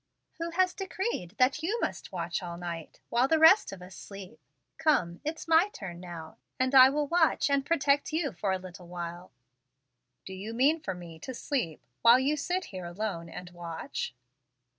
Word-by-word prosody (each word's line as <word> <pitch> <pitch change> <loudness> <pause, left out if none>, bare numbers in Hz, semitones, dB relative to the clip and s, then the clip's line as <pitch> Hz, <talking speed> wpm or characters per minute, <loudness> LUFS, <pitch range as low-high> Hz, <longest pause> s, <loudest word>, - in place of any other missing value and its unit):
"Who 335 0 -2
has 365 +2 +2
decreed 380 - -3
that 260 +4 +3
you 410 +9 -1
must - - -3
watch 175 -1 -3
all 170 -1 -6
night, 170 -2 -6
while 245 +2 +3
the 320 - +3
rest 325 +6 +7
of 190 -2 -9
us 185 +1 -11
sleep? 195 -2 -10 0.4
Come, 230 - +2
it's 315 +2 -4
my 330 +5 +5
turn 185 - -8
now, 170 -3 -9 0.2
and 255 +1 +1
I 260 -1 +10
will 295 +2 0
watch 320 -2 +2
and 280 -1 +3
protect 285 -2 +2
you 315 -3 0
for 195 +1 -2
a 190 - +1
little 185 -1 -11
while." 175 0 -7 0.9
"Do 190 - -7
you 205 +4 -6
mean 285 +7 +4
for 190 -8 -4
me 170 -2 -10
to 260 +9 -7
sleep 235 - -2 0.2
while 235 +1 +8
you 275 +4 +1
sit 365 +5 -1
here 185 -2 -5
alone 175 -2 -4
and 180 +2 -9
watch?" 170 -6 -5
220 Hz, 185 wpm, -29 LUFS, -, 0.9 s, I